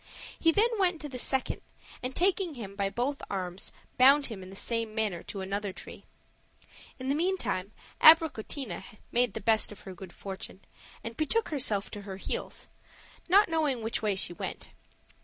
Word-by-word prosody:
He 330 - +5
then 420 +7 +4
went 360 -4 +3
to 295 - -5
the 255 -2 -5
second, 265 +1 0 0.4
and 255 +1 -4
taking 365 -3 +2
him 200 -5 -7
by 200 -1 0
both 250 +7 -1
arms, 185 -1 -3 0.3
bound 275 +3 +7
him 215 -5 -6
in 185 - -9
the 195 - -10
same 230 +1 -1
manner 210 -6 0
to 195 - -6
another 200 +1 -2
tree. - - -11 0.9
In 260 - -6
the 275 - +2
meantime 295 - 0 0.3
Abricotina 290 - +5 0.3
made 245 -3 +2
the - - -2
best 220 +1 +3
of 210 0 -11
her 190 - -8
good 185 0 -10
fortune 190 0 -8 0.4
and 230 0 -6
betook 445 - +1
herself 220 -9 0
to 205 - -6
her 195 -1 -7
heels, - - -3 0.6
not 400 +4 +7
knowing 300 -8 0
which 225 - -1
way 210 -3 +1
she 185 - 0
went. - - -6
230 Hz, 175 wpm, -30 LUFS, 195-295 Hz, 0.9 s, bound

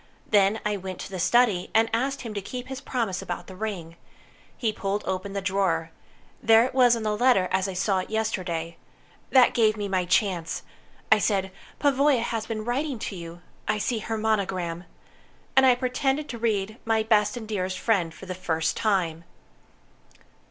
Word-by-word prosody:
Then 205 +1 +4
I 210 -1 0
went 190 -1 -6
to - - -8
the 185 - -5
study, 210 -2 +3
and 225 +1 +5
asked 270 +4 0
him 230 -4 -6
to 200 - -3
keep 250 +6 -7
his 265 0 -6
promise 230 -9 -2
about 175 - -5
the 185 - -11
ring. 185 -5 -5 0.6
He 225 -3 0
pulled 200 0 -2
open 190 +1 -3
the 200 -1 -3
drawer. 185 -4 0 0.5
There 225 +1 +6
it 260 - -4
was 250 -2 +5
on 230 - -4
the 215 -1 0
letter, 240 -5 +4
as 190 +1 +1
I 190 - -4
saw 190 +1 +1
it 185 - -5
yesterday. 180 -7 -2 0.5
That 255 -2 +6
gave 220 -3 +3
me 205 -1 -2
my 185 -2 0
chance. 175 -2 0 0.5
I - - +7
said, 195 -3 0 0.3
'Pavoya 280 -3 +3
has 225 -2 -3
been 215 -2 -4
writing 265 +3 -1
to 215 -2 -5
you. 170 0 -9 0.2
I 215 0 +1
see 225 +2 -1
her 225 +1 -3
monogram.' 185 -6 -1 0.7
And 265 0 +6
I 250 - +6
pretended 265 +3 -1
to 235 - -6
read, 215 -1 -1
'My 225 -1 +1
Best 220 +2 +2
and 220 -2 -7
Dearest 185 -3 -2
Friend', 190 -8 +1
for 190 - -12
the 185 - -4
first 165 -3 -1
time." 175 -7 0
210 Hz, 185 wpm, -26 LUFS, 185-230 Hz, 0.7 s, I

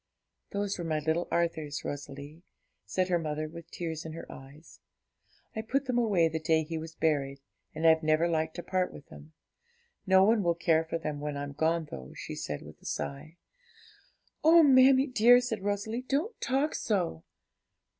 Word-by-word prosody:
'Those 200 -1 -2
were - - -3
my 160 -2 -1
little 160 +3 -1
Arthur's, 160 -4 -2
Rosalie,' 145 +2 -7 0.5
said 185 -1 0
her 175 -1 +2
mother, 155 -1 -3
with 165 +1 -11
tears 165 -3 -5
in 160 - -7
her 165 - -8
eyes; 140 +4 -14 0.8
'I 220 - -2
put 270 +5 -1
them 250 -2 0
away 200 -8 +3
the 160 0 -3
day 160 0 +2
he 165 +2 -6
was 160 0 -9
buried, 140 -3 0 0.4
and 160 +1 -2
I've 160 0 +6
never 155 +1 +2
liked 160 -1 -1
to 175 - -6
part 185 -1 -1
with 145 - -13
them. 155 +2 -13 0.7
No 190 0 +6
one 220 +2 +4
will 170 -2 +1
care 165 -1 +2
for 165 - -3
them 150 -3 -4
when 145 0 -4
I'm 145 0 -5
gone, 160 +2 0
though,' 65 0 -8
said 75 - -5
she, - - -13
with - - -14
a - - -19
sigh. 155 +4 -5 1.1
'Oh, 325 +1 +7
mammie 265 -1 +6
dear,' 245 -1 +6
said 245 -4 -3
Rosalie, 205 +4 -2
'don't 295 - -2
talk 270 +4 0
so!' 175 - -1
165 Hz, 180 wpm, -29 LUFS, 155-205 Hz, 1.1 s, Oh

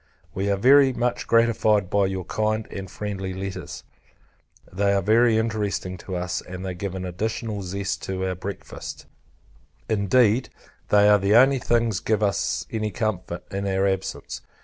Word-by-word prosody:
We 100 +2 -1
are 100 - +2
very 135 +4 +6
much 120 0 -1
gratified 110 -4 +3
by 100 -1 +3
your 95 -2 -4
kind 110 +1 -1
and 95 -2 -6
friendly 95 -2 -5
letters: 95 0 -6 0.9
they 100 +1 +2
are 100 - +2
very 115 +2 +4
interesting 105 -4 -2
to 95 - -6
us, 90 0 -2
and 90 +1 -8
they 95 - -3
give 95 +1 -5
an 95 -1 -4
additional 105 +3 -3
zest 95 +1 -3
to 95 0 -3
our 95 - -1
breakfast; 95 +2 -7 0.8
indeed, 110 +3 +2 0.4
they 105 0 +5
are 105 0 +6
the 100 +2 +2
only 135 +2 +6
things 115 -5 +1
give 110 -1 0
us 100 -1 0
any 110 -1 -1
comfort, 100 -5 -3
in 100 0 -3
our 95 0 +1
absence. 95 -1 -3
100 Hz, 160 wpm, -24 LUFS, 95-110 Hz, 0.9 s, very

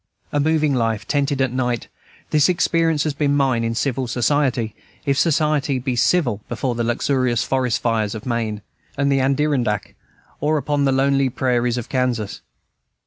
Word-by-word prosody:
A 145 - 0
moving 155 -1 +2
life, 115 -4 -1
tented 140 -1 0
at 130 -2 +1
night, 125 -2 -1 0.4
this 150 +1 +4
experience 165 -3 +2
has 155 - -1
been 145 0 +1
mine 130 -4 +2
in 115 0 -1
civil 130 0 -1
society, 125 -2 0 0.3
if 140 -2 +2
society 150 -3 +1
be 125 0 -2
civil 120 - +2
before 130 -2 -2
the 120 0 -2
luxurious 120 0 +1
forest 130 -3 0
fires 110 -3 0
of 110 - -8
Maine 115 -4 -2 0.3
and 140 0 +1
the 135 - +3
Adirondack, 130 -6 0 0.5
or 155 +1 +1
upon 145 0 0
the 135 - +3
lonely 135 0 +2
prairies 125 -1 0
of 120 - -4
Kansas. 125 -5 -1
130 Hz, 160 wpm, -21 LUFS, 120-145 Hz, 0.5 s, this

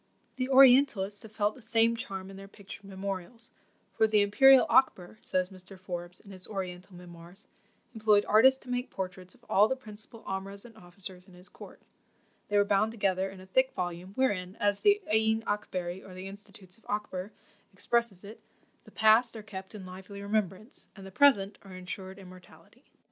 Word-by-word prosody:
The 255 0 -2
Orientalists 255 -7 +5
have 220 - -12
felt 210 -1 0
the 255 - -15
same 230 +1 +2
charm 195 -5 -7
in - - -11
their 195 0 -10
pictured 200 0 -12
memorials; 195 +3 -6 0.4
for 220 - +3
"the 215 -1 +3
imperial 265 +6 +6
Akber," 215 -7 +2
says 185 +1 -1
Mr. 185 +1 -13
Forbes, 175 -1 -6
in 200 - -15
his 185 -1 -10
Oriental 185 -2 -6
Memoirs, 175 +2 -13 0.5
"employed 215 -2 +3
artists 260 +5 +5
to 250 - -13
make 245 +1 -2
portraits 185 -1 -7
of - - -25
all 205 +2 +5
the 265 - -1
principal 220 -2 -11
omrahs 195 +2 -6
and 230 -2 -14
officers 185 -1 -11
in 185 - -17
his 180 +2 -13
court;" - - -14 0.6
they 205 - +1
were 205 - +4
bound 205 +2 +2
together 195 -3 0
in 190 0 -12
a - - -12
thick 260 +7 +1
volume, 180 +1 -5
wherein, 195 -8 0
as 205 -1 0
the 410 0 +3
Ayeen 220 0 +2
Akbery, 185 -4 -3
or 185 - -12
the 185 +1 -7
Institutes 200 -1 -11
of - - -29
Akber, 205 -2 -4 0.4
expresses 210 0 -1
it, 210 +3 -11 0.4
"The - - -14
PAST 220 +2 +4
are 215 - -9
kept 190 -1 -9
in 195 -3 -9
lively 190 +2 -10
remembrance; 210 +1 -3
and 195 -2 -11
the 190 - -10
PRESENT 210 -4 +3
are 195 -2 -12
insured 185 +1 -8
immortality." 185 -2 -16
200 Hz, 180 wpm, -29 LUFS, 185-220 Hz, 0.6 s, imperial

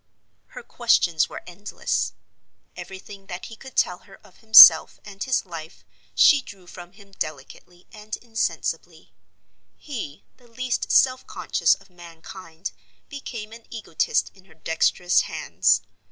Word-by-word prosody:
Her - - -8
questions 175 - +1
were - - -9
endless. 185 +4 -3 0.6
Everything 195 +1 -11
that 180 0 -7
he 225 - -10
could 265 +4 -14
tell - - +1
her - - -17
of - - -21
himself 220 -7 +8
and 200 -1 -7
his 260 -5 -1
life 165 -3 -10 0.3
she 290 -2 +6
drew 195 -7 -14
from 175 0 -13
him 200 0 -19
delicately 175 +2 -8
and 215 0 -8
insensibly: 225 -2 -4 0.6
he, 220 - -8
the 245 - -22
least 255 +1 -3
self 255 -1 +3
conscious - - +1
of 195 -1 -22
mankind, 170 0 -10 0.4
became 235 -7 -8
an 230 0 -14
egotist 205 -9 -2
in 190 -1 -22
her 160 -4 -21
dexterous 165 +2 +1
hands. - - 0
195 Hz, 135 wpm, -23 LUFS, 175-230 Hz, 0.6 s, himself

